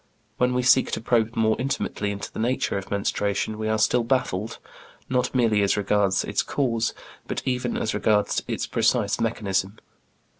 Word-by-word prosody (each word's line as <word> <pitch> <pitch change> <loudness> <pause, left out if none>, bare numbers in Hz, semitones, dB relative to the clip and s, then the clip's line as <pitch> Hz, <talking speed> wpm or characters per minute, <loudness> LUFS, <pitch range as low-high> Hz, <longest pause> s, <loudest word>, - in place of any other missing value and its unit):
When 125 0 +1
we 125 - +1
seek 125 +1 +5
to - - 0
probe 115 -1 +1
more 110 -1 +2
intimately 130 -5 -2
into 100 0 -5
the - - -7
nature 120 0 0
of 100 -1 -4
menstruation 100 +1 -1
we 110 0 -1
are 110 - +1
still 115 +2 +2
baffled, 115 -4 -1 0.5
not 125 0 0
merely 115 -4 +3
as 100 0 +2
regards 100 -1 +2
its - - 0
cause, 120 -5 -1 0.3
but - - -3
even 125 -2 -1
as 110 - -1
regards 105 0 +1
its - - -2
precise - - +1
mechanism. 95 0 -1
110 Hz, 165 wpm, -24 LUFS, 105-125 Hz, 0.5 s, seek